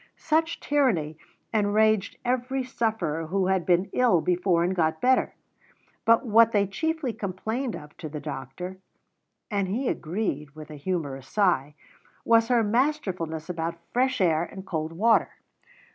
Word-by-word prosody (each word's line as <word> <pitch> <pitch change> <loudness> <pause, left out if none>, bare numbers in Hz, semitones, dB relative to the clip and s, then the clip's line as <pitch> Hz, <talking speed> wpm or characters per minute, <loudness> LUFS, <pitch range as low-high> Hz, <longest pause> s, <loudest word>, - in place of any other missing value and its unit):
Such 325 +1 0
tyranny 185 - +1 0.3
enraged 215 -1 +2
every 255 +2 0
sufferer 220 - -2
who 190 +3 0
had 190 -2 0
been 180 +2 +2
ill 240 -9 +4
before 180 0 +1
and 185 +2 0
got 160 -2 +1
better; 255 +5 +2 0.7
but 230 +3 +4
what 230 0 +5
they 200 -1 +3
chiefly 315 - -2
complained 220 +6 -3
of 150 0 -11
to 155 - -6
the 150 0 -6
doctor 145 +6 -6 0.7
(and 200 -2 0
he 240 +8 -1
agreed 155 -5 -3
with 155 0 -10
a - - -7
humourous 145 -5 -4
sigh) 175 -8 +1 0.5
was 230 0 +4
her 240 -2 +3
masterfulness 205 - -1
about 170 -1 -3 0.2
fresh 255 +1 +1
air 165 -4 +3
and 190 +2 -8
cold 160 -4 -3
water. 220 +7 +2
190 Hz, 145 wpm, -26 LUFS, 160-230 Hz, 0.7 s, what